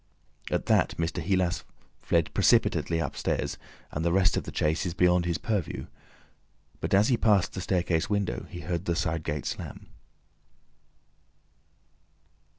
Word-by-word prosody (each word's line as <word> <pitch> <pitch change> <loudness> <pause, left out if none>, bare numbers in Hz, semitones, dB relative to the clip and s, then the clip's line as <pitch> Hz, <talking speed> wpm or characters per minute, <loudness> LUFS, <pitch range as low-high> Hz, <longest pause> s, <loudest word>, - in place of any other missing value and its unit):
At - - -1
that - - +2
Mr. 85 +2 -1
Heelas 85 -3 0 0.4
fled - - 0
precipitately 85 - +3
upstairs, 80 -5 -2 0.3
and 75 - -3
the 85 - +2
rest 95 0 +3
of - - -2
the - - -6
chase 80 +1 0
is 90 -3 -3
beyond 90 -1 +3
his 85 -2 0
purview. 105 -4 -2 0.9
But - - +1
as 105 +5 +4
he 125 - +3
passed 105 -5 +3
the 95 - -4
staircase 90 -1 0
window, 100 -12 -1
he 90 -1 -7
heard 85 0 -3
the 85 - 0
side 80 -1 -1
gate 75 -1 -3
slam. - - -6
90 Hz, 145 wpm, -28 LUFS, 80-95 Hz, 0.9 s, as